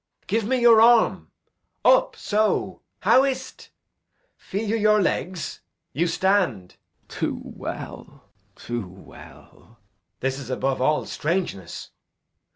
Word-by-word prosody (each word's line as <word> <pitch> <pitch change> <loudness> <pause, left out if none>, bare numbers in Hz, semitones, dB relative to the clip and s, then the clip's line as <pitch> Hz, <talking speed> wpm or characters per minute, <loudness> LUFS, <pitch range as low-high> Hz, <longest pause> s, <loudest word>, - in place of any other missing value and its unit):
Edg. - - -37
Give 220 +2 0
me 255 +3 +1
your 235 -2 +6
arm. 235 0 +4 0.6
Up - - +4
so. 215 +1 -1 0.2
How 260 - +5
is't? 260 -1 -4 0.7
Feel 210 +3 -5
you 220 - 0
your 215 -1 +3
legs? 180 -4 -2 0.3
You 170 +4 +1
stand. 170 - 0 0.3
Glou. - - -11
Too - - -1
well, - - -8 0.3
too 120 -5 -5
well. 95 +1 -16
Edg. - - -45
This 135 +1 -1
is 130 -3 -9
above 130 0 -1
all 150 +3 +1
strangeness. 155 - -3
190 Hz, 125 wpm, -24 LUFS, 135-225 Hz, 0.7 s, your